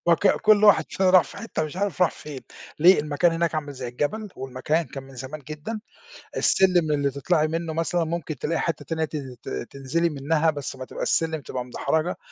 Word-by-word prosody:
وك 170 +3 +4
كُلّ 215 0 +4
واحد 205 - +6
فينا 190 -1 +2
راح 185 -2 +7
في - - -12
حِتّة 225 -8 -3
مش 155 +3 -7
عارف 190 -3 0
راح 180 - +4
فين، 145 -3 -9 0.4
ليه؟ 180 +5 +7
المكان 150 +3 +2
هناك 165 0 0
عامل 150 -2 -3
زي 130 -2 -6
الجبل، 175 - -2
والمكان 135 +5 -1
كان 135 +1 -8
من 135 0 -14
زمان 130 +4 -7
جدًا، 155 +9 -5 0.6
السلِّم 180 -5 +3
اللي 145 -1 +1
تطلعي 155 +3 +1
منه 165 0 -3
مثلًا، 165 +1 0
مُمكن 160 -2 -3
تلاقي 160 +6 -1
حِتّة 165 -3 -2
تانية 160 -1 -1
تن 140 -5 -6
ت - - -6
تنزلي 140 - -2
منها، 150 +2 +1
بس 145 -3 -5
ما 130 -1 -7
تبقاش - - -4
السلم 160 -2 +1
تبقى 125 -2 -5
مدحرجة، 160 +6 -1
155 Hz, 200 wpm, -25 LUFS, 140-170 Hz, 0.6 s, راح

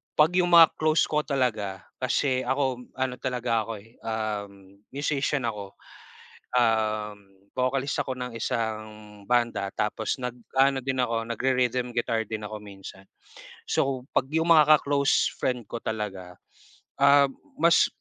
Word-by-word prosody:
pag 155 +2 +5
yung 175 -1 +2
mga 165 -2 +8
close 155 0 +3
ko 150 - +1
talaga 110 -9 -1 0.2
kasi 130 +1 +1
ako 130 -2 -1
ano 130 -1 -2
talaga 125 -3 -1
ako 115 - -5
eh, 115 +3 -21
um, 100 -3 -5 0.2
musician 140 -1 -1
ako, 100 -3 -6 0.8
um, 110 -3 +1 0.4
vocalist 130 +2 0
ako 130 -2 -5
ng 125 -1 -5
isang 110 -2 -2 0.5
banda, 120 -5 +1
tapos 105 +1 -1
nag 125 -1 -3 0.2
ano 135 0 +4
din 130 0 -2
ako 115 -2 -1
nagre-rhythm 125 0 0
guitar 115 -1 0
din 110 -1 -4
ako 110 0 -6
minsan. 95 -1 -11 0.6
So, 130 -2 0
pag 130 - +2
yung 160 +1 +2
mga 155 -1 +7
ka-close 140 -1 +1
friend 125 -3 -1
ko 120 - -4
talaga, 95 -5 -5 0.6
ah, 140 0 +7 0.3
mas 170 +1 +5
125 Hz, 135 wpm, -26 LUFS, 110-135 Hz, 0.8 s, mga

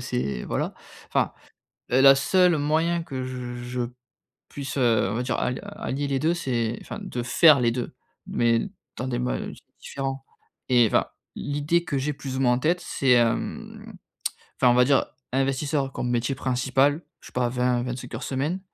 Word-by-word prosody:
c'est 65 0 -2
voilà - - -2 0.3
enfin, - - +1 0.6
heu, 125 - +3
la 135 - +5
la 135 0 +9
seule 180 +4 +3
moyen 160 +3 +1
que 130 -5 -5
je 125 -1 -5
je 125 0 -4 0.7
puisse, 140 -1 -5
heu, 115 -6 +3
on - - -2
va 125 - -1
dire, 125 -1 -1
al 125 - -1 0.2
allier 140 +2 -2
les 135 -1 0
2, 160 +5 +2
c'est 120 -8 -1
enfin - - -7
de 120 -1 -4
faire 150 +2 +6
les 120 -1 +3
2, 120 0 -4 0.3
mais 115 -1 +2 0.4
dans 125 - -3
des 120 -2 -1
mois 125 0 -1
di - - -7 0.2
différents 135 -1 -4 0.5
et 120 -3 +5
enfin - - +2 0.3
l'idée 145 +4 0
que 140 - -2
j'ai 145 +3 -1
plus 135 -1 -5
ou - - -1
moins 125 -2 +4
en 125 - +1
tête, 170 +6 +1
c'est, 135 -2 0
hem, 115 -1 0 0.7
enfin, 125 - +6
on - - +4
va 125 0 +6
dire 140 0 +3 0.3
investisseur 135 +1 0
comme 125 - -3
métier 120 +2 0
principal, 135 +4 +1 0.2
je - - -16
sais - - -12
pas, 125 -1 +1
20-25 125 0 -1
heures 115 - -5
semaine. 145 +8 -2
130 Hz, 185 wpm, -25 LUFS, 125-140 Hz, 0.7 s, la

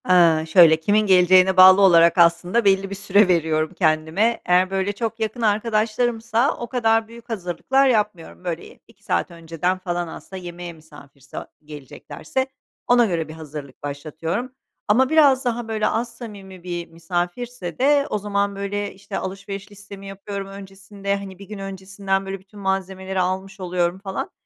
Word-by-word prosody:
Eee, 165 -3 +5
şöyle 160 -2 +7
kimin 205 +6 +2
geleceğine 185 0 +5
bağlı 185 +1 +9
olarak 170 -3 +6
aslında 175 +6 +3
belli 195 0 +3
bir 200 - -5
süre 200 +1 +3
veriyorum 160 -2 +1
kendime. 160 +7 +1
Eğer, 180 +1 +3
böyle, 195 +1 -1
çok 225 +2 -4
yakın 225 +2 -3
arkadaşlarımsa 225 +3 +1
o 240 - -6
kadar 225 -3 +1
büyük 235 +1 -14
hazırlıklar 225 +7 0
yapmıyorum. 210 -8 -1
Böyle 170 -2 -4
y - - -16
2 230 - -24
saat - - -1
önceden 165 +2 -2
falan 175 -2 -3
aslında 185 +3 -9
yemeğe 175 0 -8
misafirse 145 -4 -15 0.3
geleceklerse 150 - -5 0.4
ona 245 -1 +5
göre 170 -6 -2
bir 155 - -9
hazırlık 150 -4 -10
başlatıyorum. 160 - -4 0.4
Ama 255 +5 +3
biraz 285 -4 +4
daha, 240 -1 -2
böyle, 220 -1 0
az 230 +1 -2
samimi 195 -6 -10
bir 175 -1 -5
misafirse 175 +5 -4
de 280 +2 +3
o - - -1
zaman, 200 -1 -1
böyle, 200 +1 -3
işte, 190 - -7
alışveriş 195 +1 -6
listemi 200 -1 -11
yapıyorum 195 0 -6
öncesinde, 195 0 -5
hani, 195 -2 -8
1 200 - -10
gün 210 -1 -8
öncesinden, 195 0 -3
böyle, 195 0 -5
bütün 200 +2 -16
malzemeleri 190 -1 -2
almış 190 +2 -2
oluyorum, 180 0 -1
falan. 195 -1 -5
195 Hz, 155 wpm, -22 LUFS, 175-215 Hz, 0.4 s, bağlı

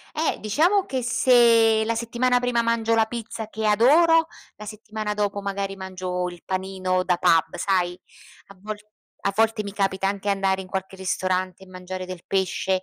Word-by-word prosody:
Eh, 315 +1 0
diciamo 340 - +2
che 260 -8 -3
se 235 -3 +4
la 230 - 0
settimana 240 +2 +1
prima 245 -1 0
mangio 230 -1 +1
la 225 -1 +3
pizza 225 -1 -6
che 220 0 -5
adoro, 320 +10 +5 0.3
la 210 - -10
settimana 215 0 -5
dopo 205 -1 -1
magari 200 0 -3
mangio 185 -1 -4
il 175 -1 -11
panino 185 -1 -1
da 180 -1 +1
pub, 165 -1 +2
sai? 180 -2 0 0.5
A 200 - -15
vol 215 +1 -5 0.5
a 200 - +1
volte 225 0 +2
mi 200 - -7
capita 195 -1 0
anche 200 0 -3
andare 195 -1 +1
in - - -12
qualche 190 0 -5
ristorante 185 0 -2
e - - -13
mangiare 185 0 -7
del 185 -2 -8
pesce, 190 0 0
200 Hz, 175 wpm, -24 LUFS, 190-230 Hz, 0.5 s, adoro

